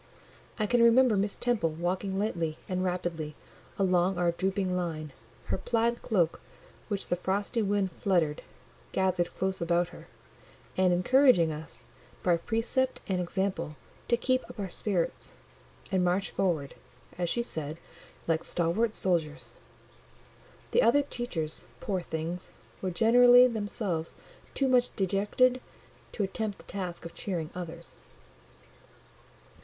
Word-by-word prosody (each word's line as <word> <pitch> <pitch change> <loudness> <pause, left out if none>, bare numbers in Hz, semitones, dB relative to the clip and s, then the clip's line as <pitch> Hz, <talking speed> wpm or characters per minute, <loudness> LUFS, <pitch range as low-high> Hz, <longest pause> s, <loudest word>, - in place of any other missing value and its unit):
I 215 - +1
can 240 +3 +3
remember 235 0 +6
Miss 200 +1 0
Temple 235 -9 +1
walking 185 +4 -2
lightly 170 -6 -1
and 185 0 -1
rapidly 170 -4 -2 0.4
along 185 -1 +2
our 175 -1 +2
drooping 190 +1 -1
line, 155 -5 -3 0.3
her - - -2
plaid 235 +3 0
cloak, 175 -7 +1 0.5
which 205 -3 -3
the - - +2
frosty 200 +6 -1
wind 200 -2 +1
fluttered, 165 -4 +1 0.5
gathered 185 -2 +1
close 190 -1 -1
about 170 +1 +2
her, - - -13 0.7
and 185 -1 +3
encouraging 180 - +5
us, 155 +1 -9 0.4
by 175 -2 +4
precept 230 +8 0
and 185 -2 0
example, 190 -3 -2 0.3
to 235 - +3
keep 255 +1 +1
up - - -10
our 195 -3 -3
spirits, 190 -6 -2 0.6
and 185 -2 +2
march 180 +2 +1
forward, 160 -7 0 0.5
as 175 -1 0
she 235 - 0
said, 155 -8 -4 0.5
"like 165 -1 +1
stalwart 195 +7 0
soldiers." 160 -5 -1 1.1
The 485 - +4
other 285 -11 +5
teachers, 185 - -4
poor 195 -3 -1
things, 170 +1 -4 0.3
were 190 - -1
generally 245 +6 +7
themselves 205 -7 -2 0.4
too 275 - +2
much 250 -1 +3
dejected 210 +7 +2 0.5
to 210 - -1
attempt 205 +1 -3
the - - -15
task 180 -4 -5
of 170 - -7
cheering 170 -5 -4
others. 170 -1 -7
190 Hz, 130 wpm, -29 LUFS, 170-220 Hz, 1.1 s, generally